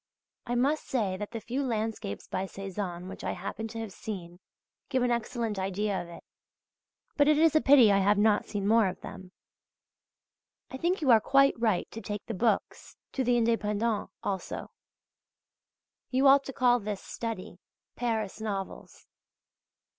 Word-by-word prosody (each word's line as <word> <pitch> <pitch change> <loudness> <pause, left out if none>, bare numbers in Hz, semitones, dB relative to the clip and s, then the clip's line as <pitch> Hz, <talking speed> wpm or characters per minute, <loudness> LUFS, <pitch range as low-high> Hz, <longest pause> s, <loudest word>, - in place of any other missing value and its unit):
I 240 - -1
must 280 +5 +1
say 210 -8 0
that 210 +1 -5
the 230 - -5
few 245 +5 -3
landscapes 220 - -3
by 185 - -2
Cézanne 190 -2 -5
which 190 - -9
I - - -1
happen 210 +4 -5
to 225 - -9
have 220 -3 -6
seen, 175 -5 -7 0.5
give 260 -2 +1
an 245 - +2
excellent 235 -3 -2
idea 195 +1 -1
of 175 - -9
it; 170 - -11 0.9
but 290 -1 +5
it 300 -1 +5
is 320 0 +4
a 310 - +5
pity 265 -6 +7
I 200 - +4
have 200 +1 +3
not 210 0 +3
seen 200 -2 -2
more 225 -1 +5
of 185 - -5
them. 185 -1 -9 1.4
I 265 - -5
think 345 +5 0
you 270 -4 +4
are 225 -2 +7
quite 275 +3 +4
right 220 -6 +1
to 225 - -7
take 205 -2 -5
the 230 - -4
"Books" 220 +1 -1
to 265 - -1
the 245 0 +3
"Indépendents" 225 -1 0
also; 195 -2 -4 1.4
you 265 +2 +2
ought 275 +1 +6
to 270 - -6
call 245 -1 +3
this 205 -2 -5
study 220 -6 -6 0.4
"Paris 220 -4 -2
Novels." 200 -3 -5
220 Hz, 165 wpm, -29 LUFS, 195-245 Hz, 1.4 s, pity